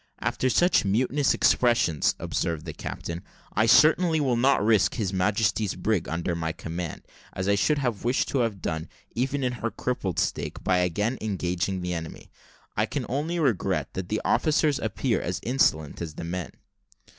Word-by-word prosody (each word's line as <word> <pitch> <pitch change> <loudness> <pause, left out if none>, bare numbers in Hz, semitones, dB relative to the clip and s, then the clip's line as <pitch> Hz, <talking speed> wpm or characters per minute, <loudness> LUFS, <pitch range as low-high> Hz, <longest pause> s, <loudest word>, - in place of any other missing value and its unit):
"After 130 - 0
such 175 +8 +3
mutinous 130 +8 +2
expressions," 115 - +3
observed 80 -2 -2
the 80 - -5
captain, 85 +3 -6 0.3
"I 105 +3 +3
certainly 160 +4 +5
will 130 -4 +1
not 130 -2 +3
risk 110 -2 +3
His 100 -6 -2
Majesty's 105 +2 +1
brig 95 0 -1
under 85 +2 -2
my 80 -1 -2
command, 85 0 -6 0.3
as 95 0 -3
I 100 - +4
should 145 +9 +2
have 120 -7 -2
wished 125 +2 +1
to 135 - 0
have 110 -6 -1
done, 80 0 -3 0.2
even 135 +3 -1
in 125 - +1
her 115 - 0
crippled 105 -8 -3
state, - - -2
by 90 - +2
again 105 +8 0
engaging 95 -2 -2
the 90 0 -2
enemy. 80 -2 -7 0.4
I - - +1
can - - -3
only 150 +7 -1
regret 130 - 0
that 95 -1 -5
the 110 - -1
officers 155 -2 +2
appear 110 +3 -1
as 90 +1 -3
insolent 80 - +1
as 80 -3 -5
the - - -6
men." 90 +1 -4
105 Hz, 170 wpm, -26 LUFS, 90-130 Hz, 0.4 s, certainly